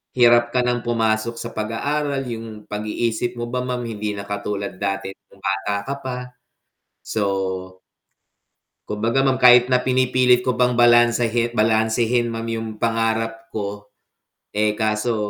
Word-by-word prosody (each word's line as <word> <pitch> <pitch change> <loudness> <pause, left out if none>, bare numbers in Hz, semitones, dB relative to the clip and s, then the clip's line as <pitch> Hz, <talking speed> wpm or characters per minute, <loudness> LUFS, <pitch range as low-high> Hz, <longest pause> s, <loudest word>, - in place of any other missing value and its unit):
hirap 120 0 +4
ka 125 - +3
ng 120 -1 -1
pumasok 115 0 0
sa 115 0 -6
pag-aaral, 140 +6 -2
yung 110 -2 -7
pag-iisip 110 +3 -2
mo 120 0 -5
ba 125 - -1
Ma'am 125 -1 -3
hindi 105 -2 -4
na 100 - -6
katulad 100 -1 -4
dati, 100 -1 -2 0.2
nung 100 - -22
bata 95 +1 -1
ka 140 +5 -4
pa. 130 -2 -5 0.8
So 95 -2 -3 1.1
kumbaga, 110 +5 0
Ma'am 135 -1 +3
kahit 125 -1 +7
na 125 -1 +2
pinipilit 130 -1 +3
ko 125 0 -1
pang 125 0 +3
balansehin 120 0 +4
balansehin 115 +2 +1
Ma'am 115 0 -4
yung 115 -1 -3
pangarap 115 0 -1
ko. 105 -1 -5 0.6
Eh, 105 0 +1
kaso 110 +2 0
115 Hz, 135 wpm, -21 LUFS, 105-120 Hz, 1.1 s, kahit